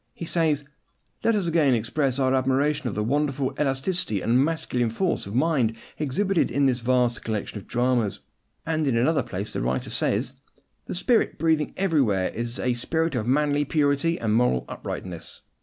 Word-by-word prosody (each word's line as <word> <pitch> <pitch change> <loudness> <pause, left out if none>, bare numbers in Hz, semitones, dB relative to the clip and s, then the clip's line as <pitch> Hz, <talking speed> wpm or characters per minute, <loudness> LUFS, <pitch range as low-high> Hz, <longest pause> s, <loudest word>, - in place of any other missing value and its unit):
He 170 - -6
says, 155 -4 +1 0.6
"Let 230 - +3
us 200 -3 0
again 160 -6 +3
express 130 +4 0
our 130 -1 +2
admiration 135 +1 +1
of - - -6
the 105 - 0
wonderful 140 +2 0
elasticity 135 - 0
and 120 +4 +3
masculine 145 -7 -1
force 165 - -1
of 100 - -6
mind 130 -6 +2 0.2
exhibited 170 +6 +1
in 140 0 +1
this 130 -2 +2
vast 125 -1 +1
collection 110 -1 -3
of - - -15
dramas;" 120 -4 0 0.5
and 160 -2 0
in 125 -4 +2
another 150 +7 +3
place 100 +3 -5
the - - -2
writer 65 +2 -2
says, - - 0 0.5
"The - - -4
spirit 225 +6 +2
breathing 160 -2 +1
everywhere 135 - +2
is 120 +1 -4
a 125 - 0
spirit 160 +7 -1
of 120 -3 -2
manly 145 +2 +2
purity 145 +3 +1
and 110 -2 0
moral 115 - +2
uprightness." 90 -3 -7
135 Hz, 170 wpm, -25 LUFS, 120-155 Hz, 0.6 s, Let